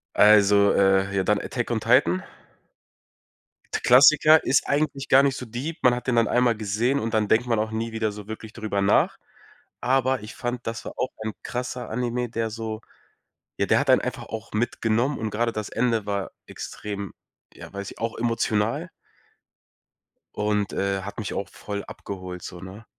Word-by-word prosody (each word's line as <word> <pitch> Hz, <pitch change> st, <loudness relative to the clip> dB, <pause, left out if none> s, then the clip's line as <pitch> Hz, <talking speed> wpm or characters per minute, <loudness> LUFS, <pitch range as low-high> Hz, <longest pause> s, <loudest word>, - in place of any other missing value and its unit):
Also, 100 Hz, -1 st, +6 dB
äh, 95 Hz, 0 st, +3 dB
ja, 95 Hz, -, +2 dB
dann 105 Hz, +1 st, +2 dB
„Attack 120 Hz, -1 st, -3 dB
on 115 Hz, -, +1 dB
Titan”. 110 Hz, -6 st, +3 dB, 1.6 s
Klassiker, 155 Hz, +4 st, +7 dB
ist 135 Hz, -, +2 dB
eigentlich 140 Hz, -2 st, -1 dB
gar 135 Hz, +1 st, +7 dB
nicht 135 Hz, -2 st, +1 dB
so 125 Hz, -, -6 dB
deep. 130 Hz, +8 st, -5 dB
Man 125 Hz, -1 st, +5 dB
hat 125 Hz, -, -7 dB
den 125 Hz, -, +2 dB
dann 115 Hz, -2 st, +3 dB
einmal 125 Hz, -2 st, +2 dB
gesehen, 115 Hz, +6 st, 0 dB
und 115 Hz, 0 st, -3 dB
dann 110 Hz, -2 st, +2 dB
denkt 115 Hz, +4 st, +2 dB
man 115 Hz, -3 st, +1 dB
auch 110 Hz, 0 st, -1 dB
nie 115 Hz, +1 st, -3 dB
wieder 110 Hz, -1 st, -1 dB
so 105 Hz, 0 st, -10 dB
wirklich 110 Hz, 0 st, -8 dB
drüber 105 Hz, -3 st, -2 dB
nach. 100 Hz, -, +3 dB, 0.6 s
Aber 130 Hz, -1 st, +1 dB
ich 105 Hz, +1 st, -10 dB
fand, 120 Hz, -1 st, -4 dB
das 115 Hz, 0 st, -4 dB
war -, -, -6 dB
auch 130 Hz, -, -1 dB
ein 110 Hz, -, -3 dB
krasser 125 Hz, 0 st, -4 dB
Anime, 120 Hz, +1 st, -2 dB
der 115 Hz, -1 st, -2 dB
so 110 Hz, 0 st, -5 dB, 0.8 s
ja, -, -, +2 dB
der -, -, +3 dB
hat -, -, -1 dB
einen -, -, +6 dB
einfach -, -, -4 dB
auch 110 Hz, 0 st, -7 dB
mitgenommen 115 Hz, +4 st, 0 dB
und 110 Hz, -2 st, -3 dB
grade 115 Hz, +2 st, 0 dB
das 110 Hz, -1 st, -5 dB
Ende 115 Hz, -2 st, 0 dB
war 100 Hz, -2 st, -3 dB, 0.2 s
extrem, 100 Hz, -1 st, -6 dB, 0.4 s
ja, -, -, -12 dB
weiß 100 Hz, 0 st, -5 dB
ich -, -, -13 dB
auch 115 Hz, 0 st, -2 dB
emotional. 115 Hz, -2 st, 0 dB, 1.5 s
und, 105 Hz, -1 st, 0 dB
äh, 100 Hz, -1 st, -1 dB
hat 100 Hz, +3 st, -7 dB
mich 105 Hz, -, -4 dB
auch 100 Hz, -, -3 dB
voll 100 Hz, -1 st, -6 dB
abgeholt 90 Hz, -2 st, -8 dB
so, 90 Hz, -, -8 dB
ne? 95 Hz, +4 st, -10 dB
110 Hz, 180 wpm, -24 LUFS, 105-125 Hz, 1.6 s, Klassiker